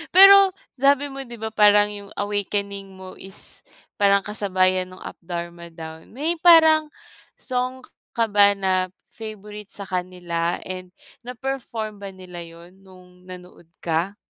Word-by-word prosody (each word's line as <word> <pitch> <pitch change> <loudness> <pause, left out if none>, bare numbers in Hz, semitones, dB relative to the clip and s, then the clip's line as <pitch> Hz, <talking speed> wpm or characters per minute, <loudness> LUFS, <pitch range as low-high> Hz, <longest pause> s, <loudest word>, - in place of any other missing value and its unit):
Pero 390 0 +9 0.3
sabi 280 +1 +3
mo 275 - -8
'di 235 - -9
ba 220 0 -5
parang 210 -1 +5
'yung 200 -1 -9
awakening 200 -1 -3
mo 185 0 -11
is 190 +1 -10 0.4
parang 200 -1 +4
kasabayan 185 -3 +1
nung 185 0 -13
Up - - -9
Dharma 170 0 -7
Down. 160 -1 -10
May 320 +5 -1
parang 320 -2 +6 0.5
song 255 0 -2
k - - -19 0.2
ka 230 - +2
ba 205 0 +5
na 185 -1 0 0.2
favourite 210 -2 -9
sa 200 - -5
kanila 180 -2 -3
and 185 -1 -8 0.3
na-perform 235 -4 -5
ba 200 - -7
nila 180 -2 -10
'yun 170 +2 -13
nung 185 -1 -19
nanood 180 -2 -12 0.2
ka? 170 +4 -1
200 Hz, 145 wpm, -23 LUFS, 180-225 Hz, 0.5 s, Pero